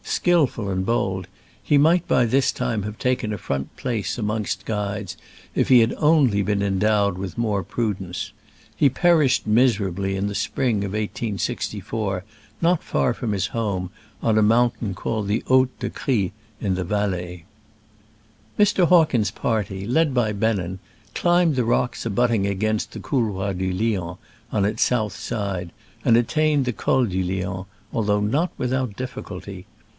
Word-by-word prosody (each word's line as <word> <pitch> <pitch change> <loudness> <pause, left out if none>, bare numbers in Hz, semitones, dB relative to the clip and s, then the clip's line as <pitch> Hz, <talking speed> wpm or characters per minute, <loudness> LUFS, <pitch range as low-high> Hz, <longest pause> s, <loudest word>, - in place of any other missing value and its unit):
39 - - -2
skillful 150 - +2
and 95 -1 -1
bold, 95 -5 -1 0.4
he 145 - +3
might 165 +4 +4
by 125 - +3
this 130 +4 +2
time 120 -5 -2
have 105 +1 -6
taken 125 -3 0
a 105 - -2
front 70 -6 -4
place 120 -4 -2
amongst 105 -2 -2
guides 105 -3 -3 0.4
if - - +1
he 125 -2 +8
had 115 0 +3
only 150 -10 +4
been 100 0 0
endowed 100 0 +2
with 95 -2 -6
more 105 -4 0
prudence. 95 -4 -3 0.4
He 145 - +4
perished 150 -2 +3
miserably 100 -5 +2
in 95 +1 -1
the 100 - -4
spring 115 +3 0
of 100 -1 -4
1864 105 -2 -3 0.4
not 170 0 +2
far 125 - +1
from 115 -2 -3
his 95 -2 0
home, 100 -6 -2 0.3
on 110 -1 +3
a - - +5
mountain 115 -1 +2
called 110 +1 -2
the 105 +2 0
Haut 130 0 +5
de - - -2
Cry, 105 -9 0 0.3
in 100 -3 0
the 90 - -2
Valais. 90 -3 -2 1.1
Mr. 200 -4 +4
Hawkins' 150 - +4
party, 105 -4 -2
led 150 +3 +2
by 110 -4 +2
Bennen, 100 -4 -1 0.4
climbed 175 -3 +3
the 125 -2 +1
rocks 120 +1 0
^abutting 115 -2 +1
against 110 +2 -1
the - - -7
Couloir 100 -7 -1
du 95 0 -2
Lion 90 -3 -1 0.3
on 100 -2 +1
its 105 - -1
south 110 -5 0
side, 100 -6 -3 0.3
and 115 - +5
attained 150 +3 +2
the 125 - -1
Col 130 +5 +2
du 95 -3 -1
Lion, 95 +1 -3 0.3
although 105 -2 +1
not 145 - +1
without 125 -3 -1
difficulty. 100 -6 -7
105 Hz, 155 wpm, -23 LUFS, 95-125 Hz, 1.1 s, he